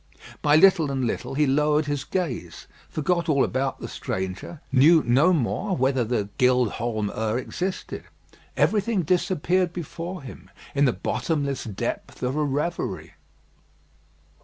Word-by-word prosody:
By 150 0 +4
little 160 -3 +5
and 135 -2 -1
little 120 - -3
he 150 +1 +3
lowered 150 +2 +2
his 145 -2 -2
gaze, 130 - -4 0.2
forgot 170 +2 0
all 140 -3 +4
about 130 +1 -1
the - - -6
stranger 95 - -5
knew 150 +5 +6
no 135 +9 +4
more 180 - 0
whether 130 -1 +2
the 110 -3 -1
"Gild 125 -3 +3
Holm 110 -3 -2
'Ur" 110 +1 -1
existed. 185 +8 -4 0.5
Everything 210 -2 +2
disappeared 180 +1 +1
before 175 0 -6
him 130 - -11 0.2
in 145 0 +3
the 125 - +4
bottomless 140 -5 -2
depth 105 +3 -5
of 125 +2 -1
a 155 - +1
reverie. 150 +5 -2
145 Hz, 135 wpm, -25 LUFS, 125-170 Hz, 0.5 s, knew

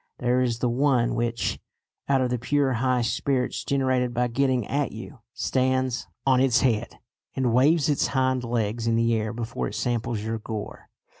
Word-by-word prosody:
There 125 +1 +1
is 120 -2 0
the 125 - 0
one 125 -1 +2
which, 115 0 -1 0.5
out 135 -1 +3
of 125 -1 0
the 125 - -1
pure 135 +2 +1
high 125 +1 +1
spirits 125 +2 -1
generated 130 -3 0
by 125 0 +1
getting 130 -2 +1
at 145 +4 -1
you, 115 +5 -9
stands 130 -1 0 0.2
on 130 -2 +4
its 125 -2 +3
head 120 -3 0 0.4
and 125 -3 +1
waves 145 +5 +4
its 145 -2 +1
hind 130 -1 0
legs 115 -1 -1
in 115 - +2
the 115 0 +2
air 110 0 -1
before 115 0 -4
it - - -7
samples 120 -2 -2
your 110 +1 -3
gore. 105 -1 -7
125 Hz, 175 wpm, -25 LUFS, 115-130 Hz, 0.5 s, on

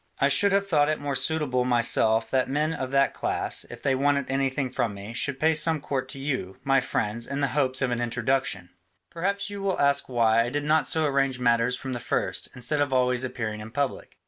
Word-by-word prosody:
I 140 - +3
should 200 +8 +2
have 200 0 +2
thought 150 -5 +3
it 155 - -1
more 145 -1 -3
suitable 150 -6 +1
myself 115 -2 +2
that 130 -1 +1
men 150 +3 0
of 130 -4 -4
that 140 0 +2
class, - - -2
if - - -11
they 135 - +2
wanted 140 0 +1
anything 135 -1 -1
from 110 -4 -1
me, 100 +3 -8
should 135 +3 -2
pay 160 +2 +3
some 155 +1 +2
court 140 -2 -3
to 135 - -4
you, 130 -9 -3
my 135 -1 +3
friends, 115 0 -2
in 140 - -3
the 140 -1 +1
hopes 130 -1 +1
of 130 - 0
an 120 0 -1
introduction. 120 -6 -1 0.4
Perhaps 200 +4 -2
you 200 -1 -6
will 195 -1 -1
ask 140 -1 +2
why 115 -2 +3
I 120 - -3
did 145 +3 -2
not 155 +1 +2
so 160 -1 +1
arrange 135 -3 +1
matters 120 0 +2
from 130 +1 -6
the 120 - -3
first, - - -2
instead 130 +4 -1
of 145 -2 0
always 125 -1 +2
appearing 115 -4 -4
in 110 - -8
public. 140 +2 -3
135 Hz, 225 wpm, -26 LUFS, 120-145 Hz, 0.4 s, I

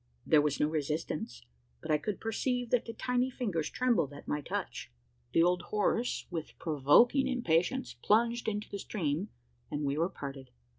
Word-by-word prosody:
There 155 - +5
was 145 -1 0
no 150 - +3
resistance; 155 - -3 0.4
but - - -4
I 150 - +4
could 205 +6 -3
perceive 245 +2 -1
that 245 - +2
the 230 - -6
tiny 250 +2 0
fingers 200 -12 -2
trembled 235 - +1
at 145 - -11
my 150 - -1
touch. - - -4 0.4
The 165 - +4
old 180 0 +3
horse, 225 +3 0
with 165 -3 -5
provoking 165 - +4
impatience, 245 0 +1
plunged 235 +2 +3
into 210 -1 -2
the 200 - -6
stream; 170 0 -2 0.4
and 145 0 -3
we 140 +1 0
were 170 +3 +2
parted. 135 -5 -7
180 Hz, 165 wpm, -31 LUFS, 150-235 Hz, 0.4 s, There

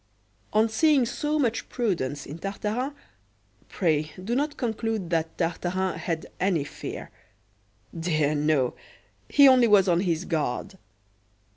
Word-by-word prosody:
On 215 +1 +4
seeing 270 +4 +3
so 300 +5 -1
much 245 -6 0
prudence 155 - -2
in 150 +4 -8
Tartarin, 215 - -3 0.7
pray 155 -4 0
do 235 +5 -1
not 290 +2 -1
conclude 220 -6 -2
that 165 -1 -1
Tartarin 180 +2 -1
had 165 -1 -3
any 180 -6 +1
fear 145 - -7 0.8
dear, 155 -3 +1
no! 145 -4 +1 0.6
he 285 -1 +7
only 255 -3 +6
was 200 -3 +5
on 175 -1 +3
his 175 -2 -1
guard. 160 +4 -2
185 Hz, 125 wpm, -26 LUFS, 160-230 Hz, 0.8 s, he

